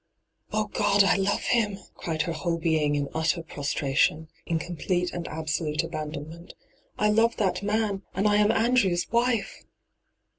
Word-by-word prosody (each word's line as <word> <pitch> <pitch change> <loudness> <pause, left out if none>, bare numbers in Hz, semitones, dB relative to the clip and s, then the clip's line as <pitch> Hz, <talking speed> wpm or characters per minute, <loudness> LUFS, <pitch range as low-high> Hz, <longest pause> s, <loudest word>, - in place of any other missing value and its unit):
' - - -52
Oh, 215 0 0
God, 205 -1 +3
I - - +4
love 195 +1 0
him 210 -5 +1
!' - - -26
cried 160 -2 -1
her 170 - -3
whole 165 +1 -1
being 155 -3 +1
in 145 -1 -1
utter 160 +1 0
prostration, 145 +1 0 0.2
in 165 - +1
complete 175 +1 -2
and 175 -1 -4
absolute 155 0 -2
abandonment. 155 +1 -7 0.2
' - - -36
I 210 0 +3
love 225 +2 +3
that 185 -3 0
man, 205 -1 0
and 195 +3 +2
I 205 0 +4
am 210 +1 +4
Andrew's 225 -7 +2
wife 235 -1 0
175 Hz, 170 wpm, -26 LUFS, 160-210 Hz, 0.2 s, I